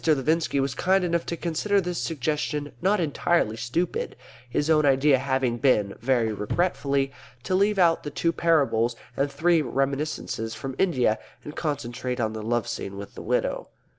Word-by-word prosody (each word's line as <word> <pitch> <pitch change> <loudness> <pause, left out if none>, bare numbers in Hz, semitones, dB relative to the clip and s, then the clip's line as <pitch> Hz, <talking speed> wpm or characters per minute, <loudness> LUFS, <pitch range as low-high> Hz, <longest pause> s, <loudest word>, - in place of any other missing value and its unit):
Levinski 155 0 +2
was 135 -1 0
kind 190 +6 +2
enough 170 -1 0
to 170 - -3
consider 175 +5 +1
this 180 -2 -2
suggestion 150 0 -2
not 195 +3 +3
entirely 160 -6 +1
stupid; 120 +10 -2 0.3
his 145 +4 0
own 155 -1 +4
idea 135 0 +4
having 130 -3 0
been 105 -7 +3
(very 120 -3 +1
regretfully) 140 - 0 0.3
to - - -2
leave 200 +2 +3
out 170 -3 +4
the 145 - -5
two 165 +3 0
parables 135 -9 +2 0.2
and 140 +1 0
three 170 +1 +3
reminiscences 135 -4 -2
from 130 +5 -5
India, 125 - +2 0.2
and 150 - -8
concentrate 125 -4 -3
on 110 -2 0
the 110 - -5
love 120 +2 -1
scene 100 -4 -5
with 100 0 -8
the - - -8
widow. - - -1
140 Hz, 165 wpm, -25 LUFS, 120-165 Hz, 0.3 s, own